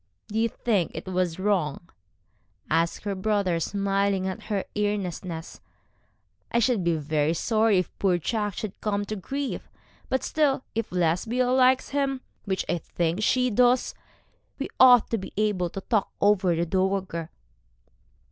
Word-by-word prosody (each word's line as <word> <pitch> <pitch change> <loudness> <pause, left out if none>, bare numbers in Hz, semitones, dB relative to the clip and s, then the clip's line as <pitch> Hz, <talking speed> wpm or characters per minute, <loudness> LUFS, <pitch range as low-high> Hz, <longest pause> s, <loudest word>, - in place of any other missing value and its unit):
'Do 215 +1 -1
you 230 +1 +2
think 205 -7 0
it - - -6
was 185 -3 -1
wrong?' 180 -5 0 0.8
asked 165 +1 +1
her 205 -1 -2
brother, 190 -3 0
smiling 195 +1 0
at 190 - -4
her 200 -3 -2
earnestness. 185 -5 -3 0.9
'I - - +1
should 235 -4 +2
be 170 -1 +2
very 155 +1 0
sorry 220 +2 +2
if 180 - -2
poor 185 -3 +3
Jack 205 +3 -2
should 215 -3 -6
come 205 -1 -1
to 215 - -4
grief. 275 +8 -4 0.4
But 260 - 0
still, 285 -4 +1
if 225 -1 -3
Lesbia 185 +9 +1
likes 255 0 +4
him 275 -2 -1 0.2
which 190 -2 -1
I 175 - 0
think 170 +4 -2
she 250 +3 +2
does 245 +3 +3 0.6
we 275 - -4
ought 250 -3 +7
to 230 - +1
be 190 - -8
able 205 -5 +1
to 195 - -6
talk 215 -1 0
over 195 -4 +3
the 170 +1 0
dowager.' 185 -2 -1
200 Hz, 150 wpm, -26 LUFS, 180-225 Hz, 0.9 s, ought